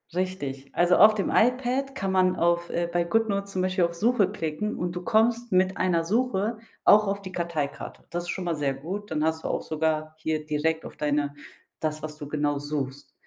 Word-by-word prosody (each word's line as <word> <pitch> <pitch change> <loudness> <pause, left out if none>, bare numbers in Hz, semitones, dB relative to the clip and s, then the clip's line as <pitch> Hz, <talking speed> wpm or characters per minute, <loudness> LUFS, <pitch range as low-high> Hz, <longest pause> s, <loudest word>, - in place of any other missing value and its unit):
Richtig. 140 -8 -3
Also, 175 +1 +4
auf 215 +1 +8
dem 200 -3 -1
iPad 255 +3 +2
kann 195 -7 -2
man 185 -1 +3
auf 170 0 +1
äh, 170 0 0
bei 175 0 +2
Goodnotes 200 +1 0
zum 185 - -1
Beispiel 185 0 +1
auf 170 0 +1
Suche 210 +1 +3
klicken 160 +7 -3
und 175 0 -3
du 180 - -4
kommst 230 +2 +2
mit 185 0 +2
einer 175 -3 +2
Suche 220 +2 0 0.3
auch 210 0 +6
auf 200 0 -1
die 185 -1 -8
Karteikarte. 170 -5 -4
Das 175 0 -3
ist 175 - -8
schon 185 -2 -3
mal 170 - 0
sehr 140 -2 0
gut. 185 +9 -6
Dann 155 -1 0
hast 160 0 0
du - - -2
auch - - -1
sogar 155 0 -1
hier 155 -1 -2
direkt 160 +1 0
auf - - -10
deine 145 -1 0 0.4
das, 155 -1 -2
was 155 0 -6
du 145 -2 -7
genau 145 -1 0
suchst. 140 -2 -4
175 Hz, 210 wpm, -26 LUFS, 155-200 Hz, 0.4 s, auf